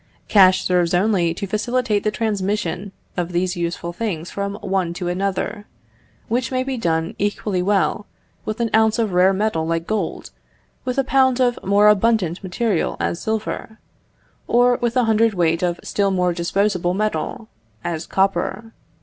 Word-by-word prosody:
Cash 185 -3 +5
serves 180 -1 +2
only 180 -3 +2
to 200 - -4
facilitate 215 +1 0
the 215 - +2
transmission 205 -3 -2 0.2
of 175 -1 -3
these 180 +1 0
useful 170 0 -3
things 175 -5 -4
from 200 0 -3
one 185 -3 -1
to 175 0 -3
another, 195 +3 -2 0.6
which 240 +2 -1
may 255 0 0
be 265 0 -3
done 165 -7 -1
equally 205 -2 -1
well 205 +2 +1 0.4
with 215 +1 -4
an 230 -1 0
ounce 220 0 +4
of 220 -5 0
rare 180 +2 +5
metal 190 -5 0
like 165 0 -1
gold, 215 +2 -3 0.5
with 250 0 -2
a 270 - +3
pound 260 -1 +3
of 245 -1 +2
more 200 +2 +4
abundant 210 -4 +2
material 195 0 -1
as 170 - -2
silver, 220 0 -3 0.7
or 245 0 +4
with 240 +1 0
a 250 - +4
hundred 225 -1 +2
weight 165 -2 +1
of 175 -1 -1
still 200 -1 0
more 180 -2 +1
abundant 180 +1 0
metal, 215 +1 -2 0.4
as 165 -2 -3
copper. 195 +3 -1
200 Hz, 160 wpm, -21 LUFS, 180-220 Hz, 0.7 s, Cash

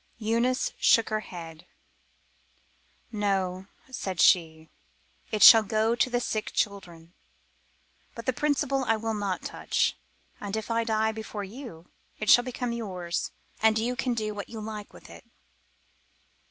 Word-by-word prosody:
Eunice 235 +3 0
shook 230 - +4
her 215 0 0
head. 165 -5 -10 1.4
"No," 195 -3 -1 0.2
said 190 -8 -5
she, 160 -3 +3 0.6
"it 215 -2 +2
shall 225 - +11
go 220 +2 +1
to 240 +2 +1
the 245 0 0
sick 220 -3 -3
children, 175 -5 -3 1.0
but 230 - -8
the 260 - +1
principal 280 -1 0
I 225 -1 +2
will 225 +1 -3
not 200 -3 -3
touch, - - -1 0.4
and 205 0 -4
if 220 +1 -5
I 230 0 +1
die 220 -1 +1
before 220 -1 -6
you 200 - -10 0.3
it 215 - +2
shall 245 - +7
become 245 -1 -4
yours 185 -7 -4 0.3
and 220 0 +4
you 240 +3 -1
can 250 -2 -1
do 215 -2 -2
what 205 -1 -7
you 225 - -7
like 215 -1 -7
with - - -15
it." - - -13
215 Hz, 145 wpm, -27 LUFS, 195-235 Hz, 1.4 s, shall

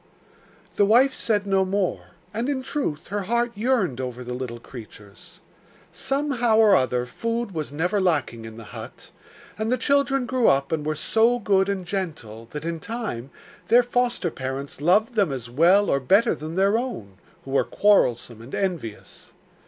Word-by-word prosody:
The 205 - +5
wife 255 +5 +5
said 210 -5 0
no 195 -1 +2
more; 190 0 -1 0.3
and 230 +5 -2
in 265 -2 -2
truth 255 - -3
her 205 +1 -2
heart 235 +4 0
yearned 205 - 0
over 125 -1 -5
the 125 0 -5
little 125 -2 -5
creatures. 105 -4 -13 0.5
Somehow 270 -5 0
or 220 -2 +6
other 125 -1 +1
food 230 - -3
was 155 -5 -4
never 180 +7 0
lacking 145 -10 0
in 110 0 -10
the 115 - -9
hut, 110 -2 -10 0.5
and 220 +2 -1
the 255 - +2
children 275 0 +1
grew 255 -1 +1
up 140 0 +2
and 160 -2 -1
were 155 +1 -1
so 225 +8 +2
good 195 -4 +2
and 190 -2 -2
gentle 155 - -5
that, 150 +4 -7
in 165 -1 -3
time, 210 - -5 0.4
their 240 +2 +6
foster 240 -7 0
parents 135 +1 -6
loved 205 - +3
them 200 -8 +2
as 120 -3 -6
well 180 +9 +4
or 140 - +2
better 200 - +3
than 155 +2 -7
their 200 +4 +3
own, 105 - -6 0.3
who 135 - -8
were 135 - +3
quarrelsome 120 - +2
and 120 +4 -8
envious. 165 - -5
190 Hz, 170 wpm, -24 LUFS, -, 0.5 s, or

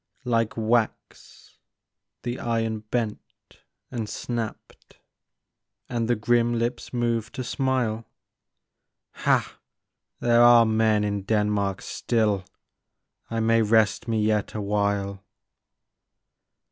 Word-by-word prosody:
Like 115 -2 0
wax 115 0 -2 0.6
the 120 +1 -3
iron 115 -2 -1
bent 115 -4 -5 0.3
and 115 -4 -4
snapped, 115 -3 -6 0.9
And 115 -2 -2
the 120 - +2
grim 120 +2 +2
lips 120 +1 -3
moved 120 -1 -1
to 130 - -3
smile. 125 -4 -1 0.5
" - - -58
Ha! - - +1 0.6
There 120 0 +4
are 120 -1 +8
men 110 -1 +2
in 100 -1 -1
Denmark 105 -1 0
still; 105 -5 0 0.9
I 115 0 -1
may 115 0 +3
rest 110 0 +2
me 115 -1 0
yet 105 -1 0
a 105 - -2
while." 100 -1 -1
115 Hz, 105 wpm, -25 LUFS, 105-120 Hz, 0.9 s, are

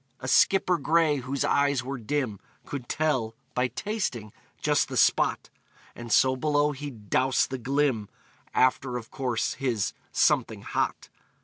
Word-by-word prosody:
A 130 - -6
skipper 180 +4 +4
gray, 155 +1 +3
whose 135 +1 -2
eyes 140 -2 +2
were 135 +1 -5
dim, 120 -3 -2 0.3
Could 135 -4 -6
tell, 130 -8 0 0.2
by 125 +1 +1
tasting, 125 - -4 0.3
just - - +2
the - - -4
spot, - - +2 0.4
And 120 -1 -8
so 130 +4 +4
below 145 +2 +1
he'd 135 -8 -9
"dowse 130 0 +3
the 130 -1 -5
glim" 130 -4 0 0.5
After, 130 -1 +2
of 115 -2 -9
course, 125 -4 -1
his 120 -7 -1 0.2
"something - - +1
hot." - - -2
130 Hz, 140 wpm, -27 LUFS, 120-145 Hz, 0.5 s, skipper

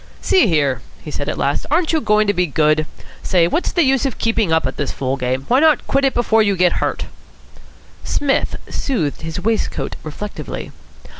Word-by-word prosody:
"See 375 - +3
here," 140 - +1 0.2
he 150 - -7
said 145 - -3
at - - -3
last, 140 +1 -1
"aren't 320 +3 +1
you 315 - +2
going 215 -2 +3
to 205 - +2
be 180 -2 +1
good? 155 +1 +2 0.3
Say, 175 -3 +2
what's 335 - -1
the 345 - +2
use 270 -2 +2
of 270 -3 -2
keeping 225 -5 0
on 160 0 +3
at 130 - -3
this 145 - -2
fool 135 0 -2
game? 130 0 -2
Why 255 - +4
not 310 -1 +4
quit 275 0 +1
it 270 - +1
before 225 -2 +3
you 200 -2 +2
get 180 -1 +3
hurt?" - - -1 1.0
Psmith 280 -2 0
smoothed 180 - -2
his 160 +2 -5
waistcoat 220 +2 -1
reflectively. 180 +7 -6
190 Hz, 195 wpm, -19 LUFS, -, 1.0 s, Why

